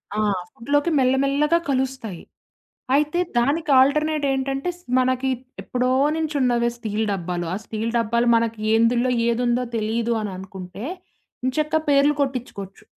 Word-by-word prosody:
ఆ! -, -, -1 dB, 0.3 s
ఫుడ్‌లోకి 290 Hz, +7 st, 0 dB
మెల్ల 255 Hz, 0 st, +3 dB
మెల్లగా 295 Hz, +4 st, +2 dB
కలుస్తాయి. 260 Hz, -8 st, -2 dB, 0.7 s
అయితే 300 Hz, +4 st, +1 dB, 0.2 s
దానికి 290 Hz, +6 st, +1 dB
ఆల్టర్‌నేట్ 300 Hz, +2 st, +2 dB
ఏంటంటే, 270 Hz, +4 st, -1 dB
స్ 355 Hz, -, -22 dB, 0.2 s
మనకి 255 Hz, +1 st, +1 dB, 0.3 s
ఎప్పుడో 250 Hz, 0 st, -1 dB, 0.3 s
నుంచి 315 Hz, -1 st, -2 dB
ఉన్నవే 240 Hz, -2 st, +2 dB
స్టీల్ 220 Hz, -1 st, -2 dB
డబ్బాలు. 175 Hz, -2 st, -3 dB
ఆ -, -, -1 dB
స్టీల్ 225 Hz, +1 st, -3 dB
డబ్బాలు 235 Hz, +1 st, +1 dB
మనకి 230 Hz, -1 st, 0 dB
ఏందుల్లో 235 Hz, +2 st, +3 dB, 0.2 s
ఏదుందో, 240 Hz, +1 st, +1 dB
తెలీదు 225 Hz, +2 st, 0 dB
అని 210 Hz, -2 st, -4 dB
అనుకుంటే 190 Hz, +2 st, -8 dB, 0.6 s
ఏంచక్కా 305 Hz, +4 st, +1 dB
పేర్లు 285 Hz, +1 st, +4 dB
కొట్టించుకోవచ్చు. 245 Hz, -8 st, -4 dB
250 Hz, 130 wpm, -22 LUFS, 225-280 Hz, 0.7 s, పేర్లు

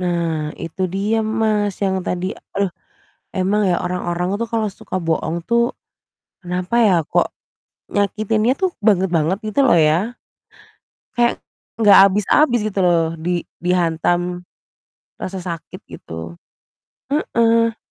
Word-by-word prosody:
Nah, 170 Hz, -4 st, -1 dB
itu 165 Hz, +3 st, -5 dB
dia, 210 Hz, +3 st, +1 dB
Mas, 215 Hz, -2 st, 0 dB
yang 190 Hz, -1 st, 0 dB
tadi 180 Hz, +1 st, -2 dB, 0.2 s
aduh, 195 Hz, -3 st, 0 dB, 0.6 s
emang 195 Hz, +2 st, +1 dB
ya 175 Hz, -, +2 dB
orang-orang 180 Hz, 0 st, -2 dB
tuh 230 Hz, -, -2 dB
kalau 225 Hz, -1 st, +1 dB
suka -, -, -5 dB
bohong 165 Hz, 0 st, -1 dB
tuh, 235 Hz, +1 st, +2 dB, 0.7 s
kenapa 180 Hz, +3 st, -3 dB
ya 195 Hz, -, +4 dB, 0.2 s
kok -, -, +3 dB, 0.6 s
nyakitinnya 215 Hz, +4 st, +1 dB
tuh 375 Hz, -, +3 dB, 0.2 s
banget-banget 180 Hz, -3 st, +2 dB
gitu 215 Hz, -, -1 dB
loh 250 Hz, -, +5 dB
ya. 170 Hz, +8 st, +3 dB, 1.0 s
Kayak 240 Hz, 0 st, +2 dB, 0.4 s
nggak 205 Hz, -2 st, +8 dB
habis-habis 210 Hz, +7 st, +3 dB
gitu 200 Hz, -2 st, -3 dB
loh 170 Hz, -2 st, +4 dB, 0.2 s
di 175 Hz, +2 st, -1 dB, 0.2 s
dihantam 175 Hz, 0 st, 0 dB, 0.8 s
rasa 190 Hz, 0 st, -4 dB
sakit 170 Hz, -3 st, -7 dB
gitu. 80 Hz, +1 st, -8 dB, 0.8 s
Heeh. 230 Hz, -5 st, +2 dB
190 Hz, 115 wpm, -20 LUFS, 175-215 Hz, 1.0 s, nggak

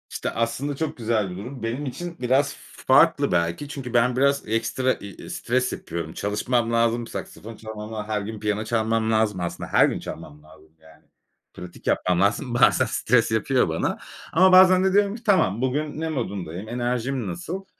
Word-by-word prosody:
İşte, -, -, -3 dB
aslında 115 Hz, +5 st, -2 dB
çok 160 Hz, +2 st, -3 dB
güzel 110 Hz, -4 st, 0 dB
bir 90 Hz, -, -7 dB
durum. 125 Hz, +5 st, -8 dB
Benim 120 Hz, +6 st, -3 dB
için 170 Hz, +6 st, -6 dB
biraz 130 Hz, +3 st, +2 dB
f -, -, -16 dB
farklı -, -, +5 dB
belki. 85 Hz, +10 st, 0 dB
Çünkü 135 Hz, -4 st, -7 dB
ben 120 Hz, +1 st, +3 dB
biraz 140 Hz, 0 st, +2 dB
ekstra, 125 Hz, +4 st, 0 dB
iii, 100 Hz, -2 st, -10 dB
stres 125 Hz, +1 st, -1 dB
yapıyorum. 85 Hz, -1 st, -6 dB
Çalışmam 115 Hz, +3 st, -1 dB
lazım, 115 Hz, 0 st, +1 dB
saksafon 115 Hz, +2 st, -8 dB
çalmam 110 Hz, 0 st, -8 dB
la 105 Hz, -1 st, -5 dB
her 105 Hz, -1 st, -1 dB
gün 110 Hz, +2 st, -6 dB
piyano 105 Hz, 0 st, -1 dB
çalmam 115 Hz, 0 st, 0 dB
lazım. 110 Hz, -3 st, +1 dB
Aslında 90 Hz, -1 st, -4 dB
her -, -, +6 dB
gün -, -, -2 dB
çalmam 75 Hz, 0 st, -9 dB
lazım. 80 Hz, 0 st, -19 dB
Yani, 80 Hz, 0 st, -19 dB, 0.5 s
pratik 90 Hz, -1 st, -11 dB
yapmam 90 Hz, -1 st, +1 dB
lazım. 110 Hz, +6 st, +1 dB
Bazen 125 Hz, +1 st, +4 dB
stres 115 Hz, 0 st, +1 dB
yapıyor 110 Hz, -1 st, +1 dB
bana 80 Hz, -, -1 dB, 0.4 s
ama 185 Hz, +3 st, +6 dB
bazen 185 Hz, 0 st, +7 dB
de 190 Hz, 0 st, +2 dB
diyorum 205 Hz, 0 st, +3 dB
ki 235 Hz, -, -11 dB
tamam 160 Hz, -, +2 dB
bugün 145 Hz, +4 st, -2 dB
ne 160 Hz, -, -2 dB
modundayım? 100 Hz, -, -4 dB
Enerjim 125 Hz, 0 st, -2 dB
nasıl? 180 Hz, +2 st, -5 dB
115 Hz, 180 wpm, -24 LUFS, 105-135 Hz, 0.5 s, bazen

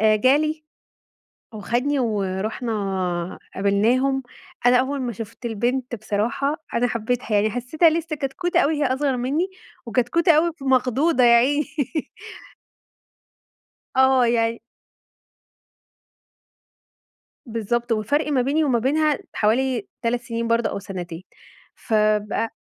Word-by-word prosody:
جالي 275 Hz, +9 st, +3 dB, 0.9 s
وخدني 245 Hz, +7 st, -1 dB
ورُحنا 195 Hz, -4 st, -2 dB, 0.2 s
قابلناهم. 240 Hz, +7 st, +2 dB, 0.4 s
أنا 245 Hz, 0 st, +6 dB
أول 265 Hz, +2 st, -1 dB
ما 245 Hz, -, -2 dB
شفت 225 Hz, +3 st, -9 dB
البنت 240 Hz, +3 st, -1 dB
بصراحة 220 Hz, +7 st, -1 dB, 0.2 s
أنا 245 Hz, +1 st, +2 dB
حبيتها 235 Hz, +2 st, -2 dB
يعني 205 Hz, +1 st, +3 dB
حسيتها 250 Hz, +8 st, +2 dB
لسه 320 Hz, -1 st, -2 dB
كتكوتة 340 Hz, +6 st, -1 dB
أوي 315 Hz, -2 st, +2 dB
هي -, -, +2 dB
أصغر 270 Hz, -2 st, 0 dB
مني، 290 Hz, +10 st, -1 dB, 0.4 s
وكتكوتة 255 Hz, +9 st, +2 dB
أوي 330 Hz, +2 st, +3 dB
مخضوضة 260 Hz, +2 st, +2 dB
يا 235 Hz, 0 st, +7 dB
عيني. 285 Hz, +5 st, +3 dB, 2.3 s
آه 265 Hz, -1 st, +5 dB
يعني 230 Hz, -1 st, +1 dB, 2.9 s
بالضبط 235 Hz, +1 st, -2 dB
والفرق 225 Hz, +8 st, +1 dB
ما 260 Hz, -, +2 dB
بيني 285 Hz, +5 st, +1 dB
وما 255 Hz, -5 st, +2 dB
بينها 300 Hz, +3 st, +1 dB
حوالي 235 Hz, +1 st, +1 dB
3 235 Hz, +1 st, 0 dB
سنين 230 Hz, -1 st, -3 dB
برضه 230 Hz, 0 st, +1 dB
أو -, -, -4 dB
سنتين 180 Hz, -3 st, -7 dB, 0.5 s
فبقى 215 Hz, 0 st, 0 dB
245 Hz, 105 wpm, -22 LUFS, 220-275 Hz, 2.9 s, يا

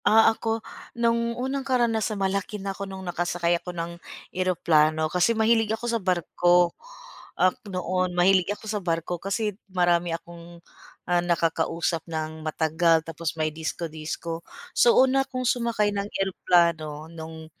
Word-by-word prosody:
Ah, 225 Hz, +1 st, +6 dB
ako 225 Hz, 0 st, -3 dB, 0.3 s
no'ng 235 Hz, 0 st, +1 dB
unang 265 Hz, +2 st, -2 dB
karanasan, 235 Hz, -5 st, +1 dB
malaki 195 Hz, +2 st, -1 dB
na 195 Hz, -1 st, -4 dB
ako 195 Hz, 0 st, -6 dB
nung 190 Hz, 0 st, -7 dB
nakasakay 175 Hz, 0 st, 0 dB
ako -, -, -8 dB
ng 170 Hz, -1 st, -4 dB, 0.4 s
eroplano 160 Hz, -4 st, +2 dB
kasi 180 Hz, +6 st, +3 dB
mahilig 225 Hz, 0 st, +3 dB
ako 235 Hz, -, -7 dB
sa 235 Hz, -1 st, 0 dB
barko. 175 Hz, -1 st, +2 dB, 0.6 s
Um, 185 Hz, 0 st, +4 dB, 0.2 s
noon 185 Hz, 0 st, -1 dB
mahilig 185 Hz, 0 st, +4 dB
ako 205 Hz, -, -6 dB
sa 210 Hz, -1 st, -2 dB
barko 170 Hz, 0 st, -2 dB
kasi 205 Hz, +2 st, -1 dB, 0.2 s
marami 175 Hz, -2 st, +2 dB
akong, 170 Hz, +1 st, -9 dB, 0.5 s
ah, 175 Hz, 0 st, +2 dB
nakakausap 170 Hz, -1 st, 0 dB
ng 160 Hz, 0 st, -4 dB
matagal 160 Hz, +1 st, +2 dB
tapos 165 Hz, 0 st, -4 dB
may 155 Hz, -1 st, 0 dB
disco-disco. 160 Hz, +1 st, -5 dB, 0.3 s
So, 240 Hz, -, +5 dB
una 265 Hz, +1 st, +5 dB
akong 255 Hz, -1 st, -4 dB
sumakay 235 Hz, -4 st, +1 dB
ng 200 Hz, 0 st, -3 dB
eroplano 170 Hz, -5 st, +1 dB
no'ng 160 Hz, 0 st, -8 dB
180 Hz, 140 wpm, -25 LUFS, 165-215 Hz, 0.6 s, Ah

